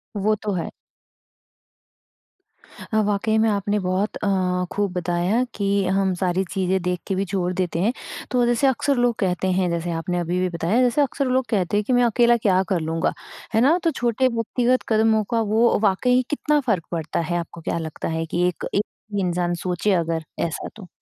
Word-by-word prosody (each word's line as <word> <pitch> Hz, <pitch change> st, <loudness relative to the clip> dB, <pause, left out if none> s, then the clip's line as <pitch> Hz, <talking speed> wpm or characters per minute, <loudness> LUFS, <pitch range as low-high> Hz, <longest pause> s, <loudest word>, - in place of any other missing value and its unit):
वो 210 Hz, +2 st, +1 dB
तो 210 Hz, -, -2 dB
है। 170 Hz, -, -2 dB, 2.2 s
अ, 220 Hz, -, +4 dB
वाक़ई 210 Hz, +2 st, +1 dB
में 220 Hz, 0 st, +3 dB
आपने 205 Hz, 0 st, 0 dB
बहुत 185 Hz, +3 st, -1 dB
अ, 205 Hz, -, -3 dB, 0.4 s
खूब 205 Hz, -1 st, -1 dB
बताया 180 Hz, +6 st, 0 dB
कि 200 Hz, -1 st, +1 dB
हम 190 Hz, -1 st, +1 dB
सारी 185 Hz, +1 st, +1 dB
चीज़ें 190 Hz, -1 st, 0 dB
देखके 180 Hz, +2 st, -2 dB
भी 195 Hz, -, 0 dB
छोड़ 185 Hz, -1 st, -1 dB
देते 180 Hz, -2 st, -1 dB
हैं। 220 Hz, +8 st, +2 dB, 0.4 s
तो 245 Hz, -1 st, +3 dB
जैसे 240 Hz, +3 st, +2 dB
अक्सर 270 Hz, +2 st, +1 dB
लोग 245 Hz, -1 st, +2 dB
कहते 185 Hz, -1 st, 0 dB
हैं 185 Hz, -1 st, +1 dB
जैसे 170 Hz, 0 st, -2 dB
आपने 170 Hz, +2 st, -2 dB
अभी-अभी 180 Hz, +2 st, 0 dB
बताया, 195 Hz, +10 st, +1 dB
जैसे 250 Hz, +3 st, +3 dB
अक्सर 280 Hz, 0 st, 0 dB
लोग 255 Hz, 0 st, +1 dB
कहते 205 Hz, -2 st, +1 dB
हैं 210 Hz, -, +1 dB
कि, 255 Hz, -, -1 dB
"मैं 245 Hz, -, +4 dB
अकेला 235 Hz, 0 st, +4 dB
क्या 190 Hz, -4 st, +2 dB
कर 180 Hz, -, +1 dB
लूँगा?" 160 Hz, +1 st, -1 dB, 0.4 s
है 220 Hz, -, +3 dB
ना? 300 Hz, +8 st, +5 dB
तो 330 Hz, -, +2 dB
छोटे 245 Hz, -1 st, +1 dB
व्यक्तिगत 245 Hz, +2 st, 0 dB
कदमों 220 Hz, -1 st, +3 dB
का 230 Hz, -, +2 dB
वो 235 Hz, +2 st, +4 dB
वाक़ई 250 Hz, +6 st, +3 dB
कितना 295 Hz, 0 st, +1 dB
फ़र्क 185 Hz, -8 st, +1 dB
पड़ता 160 Hz, -2 st, -2 dB
है? 170 Hz, +1 st, -1 dB
आपको 170 Hz, 0 st, -8 dB
क्या 165 Hz, -, -2 dB
लगता 160 Hz, -2 st, -5 dB
है 165 Hz, -, -2 dB
कि 175 Hz, +2 st, 0 dB
एक 180 Hz, -, -3 dB
एक 205 Hz, -, +3 dB, 0.3 s
ही 205 Hz, -, 0 dB
इंसान 175 Hz, -1 st, 0 dB
सोचे 180 Hz, +3 st, 0 dB
अगर 165 Hz, 0 st, -2 dB, 0.2 s
ऐसा 165 Hz, -, -4 dB
तो? 205 Hz, -5 st, -11 dB
200 Hz, 190 wpm, -23 LUFS, 180-230 Hz, 2.2 s, ना